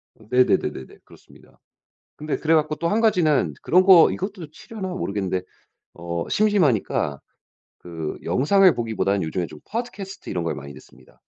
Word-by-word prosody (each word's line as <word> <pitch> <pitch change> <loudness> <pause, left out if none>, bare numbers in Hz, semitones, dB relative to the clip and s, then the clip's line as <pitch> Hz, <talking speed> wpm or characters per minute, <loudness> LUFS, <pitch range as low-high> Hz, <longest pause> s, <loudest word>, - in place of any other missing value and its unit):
네네네네네. 110 - 0
그렇습니다. - - -20 0.6
근데 150 0 -3
그래 160 +1 +1
갖고 155 -1 +1
또 170 - -2
1 215 +5 +1
가지는 175 -10 +2
그런 185 +2 +4
거 185 -4 +7
이것도 190 -5 -6
치려나 195 +4 -8
모르겠는데 100 - -3 0.5
어 85 0 -5
심심하니까 150 - +1 0.6
그 80 -3 -6
영상을 185 +7 +4
보기보다는 110 -4 -1
요즘에 85 +2 -2
좀 75 - -13
팟캐스트 210 -4 -6
이런 90 -3 -2
걸 85 - -2
많이 70 +1 -9
듣습니다. 65 -2 -19
150 Hz, 350 characters per minute, -23 LUFS, -, 0.6 s, 거